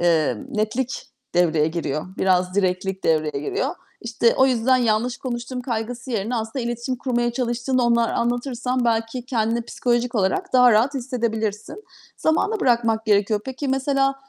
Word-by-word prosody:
eee, 160 -7 +2
netlik 220 +4 -2 0.3
devreye 160 -3 +3
giriyor, 155 -2 -3
biraz 185 -1 +2
direktlik 190 0 -1
devreye 155 -3 +1
giriyor. 410 +5 -1 0.3
İşte, 230 0 +1
o 265 - +5
yüzden 255 0 +3
yanlış 240 0 +1
konuştum 250 0 -5
kaygısı 240 +1 -4
yerine 225 +2 -1
aslında 225 +4 -3
iletişim 240 +2 -3
kurmaya 240 -1 -1
çalıştığını 250 +1 0
onlara 235 -1 +2
anlatırsan 245 +1 -1
belki 230 +2 -1
kendini 230 -1 0
psikolojik 240 +1 -1
olarak 190 +1 0
daha 250 -1 +6
rahat 240 +6 +3
hissedebilirsin. 230 - -3 0.3
Zamana 400 +7 +1
bırakmak 230 -3 +2
gerekiyor. 205 0 +2
Peki, 265 +2 -4
mesela 270 +1 +1
235 Hz, 140 wpm, -22 LUFS, 215-255 Hz, 0.3 s, daha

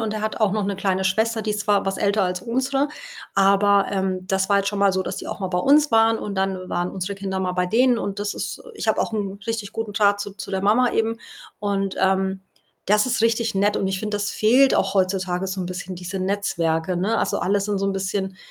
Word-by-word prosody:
und 220 -1 -2
der 215 - -4
hat 215 +1 -3
auch 215 - +3
noch 210 0 -1
'ne 200 -1 -2
kleine 190 -1 0
Schwester, 220 +4 +1
die 215 - -2
ist 210 0 -2
zwar 205 -1 +2
was 195 0 -2
älter 205 0 +2
als 180 -1 -1
unsere, 265 +5 0 0.5
aber, 200 0 +4
ähm, 190 -1 -2
das 190 -1 0
war 200 - +4
jetzt 200 0 +1
schon 205 -1 -3
mal 200 -1 +3
so, 190 - 0
dass - - -5
die - - -7
auch - - -6
mal 190 - -2
bei 180 -1 -1
uns 290 +7 +4
waren 225 0 +4
und 205 - -5
dann 190 -1 -2
waren 175 +1 -1
unsere 190 +1 -4
Kinder 195 -1 -4
mal 185 -1 -1
bei 180 0 0
denen. 245 +5 +3
Und 200 -2 -4
das 205 0 -2
ist, - - -5
äh - - -12
ich 325 - -4
habe 220 - +2
auch - - -1
'n 200 -2 -3
richtig 225 -3 -3
guten 225 -2 -4
Draht 205 0 +3
zu 205 - -4
zu 200 - -8
der 190 0 -2
Mama 230 +5 +3
eben. 225 0 0 0.4
Und, 195 -1 -2
ähm, 190 0 +1 0.5
das 210 +2 +4
ist 245 -3 -1
richtig 230 -1 +1
nett 205 +2 +2
und 195 - 0
ich 190 0 -2
finde, 210 -1 -2
das 205 0 -2
fehlt 255 +5 +4
auch 195 +1 +1
heutzutage 185 -1 0
so 190 0 -3
'n 180 - -3
bisschen 180 +1 -6
diese 180 +2 -5
Netzwerke, 180 -3 -1
ne? 200 +6 0
Also, - - 0
alle 200 +2 +1
sind 205 +1 -1
so 195 - -1
'n 195 - 0
bisschen, 190 0 -3
200 Hz, 255 wpm, -22 LUFS, 190-215 Hz, 0.5 s, aber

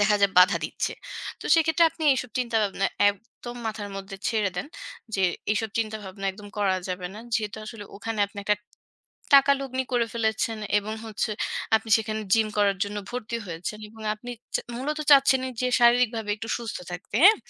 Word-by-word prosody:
দেখা 210 0 +4
যায় 200 -1 +5
বাধা 180 +2 +7
দিচ্ছে। - - -2 0.5
তো - - -10
সেক্ষেত্রে 325 +1 +4
আপনি 320 - -10
এইসব 250 -2 -3
চিন্তাভাবনা 215 -5 +1 0.2
একদম 230 +4 -6
মাথার 215 -2 -4
মধ্যে 195 0 -7
ছেড়ে 215 -4 +1
দেন। 180 - -2 0.5
যে 190 - +1 0.3
এইসব 220 +1 -1
চিন্তাভাবনা 210 -3 -4
একদম 205 +1 -11
করা 195 -2 +2
যাবে 180 0 -3
না। 215 - -8 0.2
যেহেতু 215 -1 -1
আসলে 215 -2 -8
ওখানে 220 +1 -4
আপনি 200 +1 -12
একটা 210 +1 +3 0.8
টাকা 280 0 +8
লগ্নি 260 -1 -2
করে 235 -1 +2
ফেলেছেন 220 -1 0 0.2
এবং 210 +1 -4
হচ্ছে 220 0 -2 0.5
আপনি 220 - -5
সেখানে 220 -1 -3
জিম 220 -1 +4
করার 200 -1 +3
জন্য 205 +1 -6
ভর্তি 235 -1 -4
হয়েছেন 175 +5 -5
এবং 220 +1 -13
আপনি 240 +3 -9 0.2
চা - - +2 0.2
মূলত 295 +5 -2
চাচ্ছেনই 265 -2 +6
যে 250 - +2
শারীরিকভাবে 235 -3 +4
একটু 225 +2 -7
সুস্থ 230 -1 -5
থাকতে, 180 +2 -8
হ্যাঁ? 420 +4 +9
220 Hz, 170 wpm, -26 LUFS, 205-240 Hz, 0.8 s, হ্যাঁ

